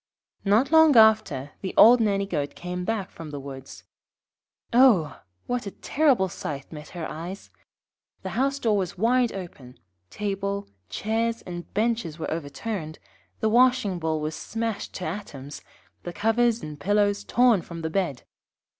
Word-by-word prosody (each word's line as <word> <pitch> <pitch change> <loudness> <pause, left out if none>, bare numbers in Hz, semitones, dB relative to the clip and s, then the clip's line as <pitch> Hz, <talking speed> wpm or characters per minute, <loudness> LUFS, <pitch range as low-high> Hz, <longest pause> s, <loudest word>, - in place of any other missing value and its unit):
Not 220 +8 +3
long 320 -4 +6
after 215 -11 +4
the 190 - -5
old 240 +2 +8
Nanny 200 -2 +1
goat 145 -7 -3
came 180 0 -5
back 200 -1 -2
from 165 -2 -9
the 145 -1 -6
woods. 135 -1 -10 0.9
Oh! 210 - +4 0.2
what 245 -3 -2
a 200 - -8
terrible 275 -10 +2
sight 145 -5 -6
met 150 -1 -9
her 160 - -3
eyes! 175 +5 -8 0.7
The - - -4
house 275 +3 0
door 225 -6 +1
was 190 -2 -2
wide 240 +4 +2
open, 145 -10 -9 0.3
table, 200 -1 -3 0.2
chairs, 225 +2 -1
and 175 -1 -8
benches 220 -7 0
were 165 - -4
overturned, 160 +2 -5 0.4
the 220 - +2
washing 245 -5 +3
bowl 160 -1 -1
was 155 +1 -3
smashed 225 +3 -4
to 185 - -5
atoms, 150 -6 -7 0.4
the 175 - -7
covers 230 +3 +1
and 150 -1 -7
pillows 205 +3 +1
torn 240 -5 +3
from 165 -1 -9
the 160 - -2
bed. 170 -9 -1
200 Hz, 150 wpm, -25 LUFS, 160-230 Hz, 0.9 s, old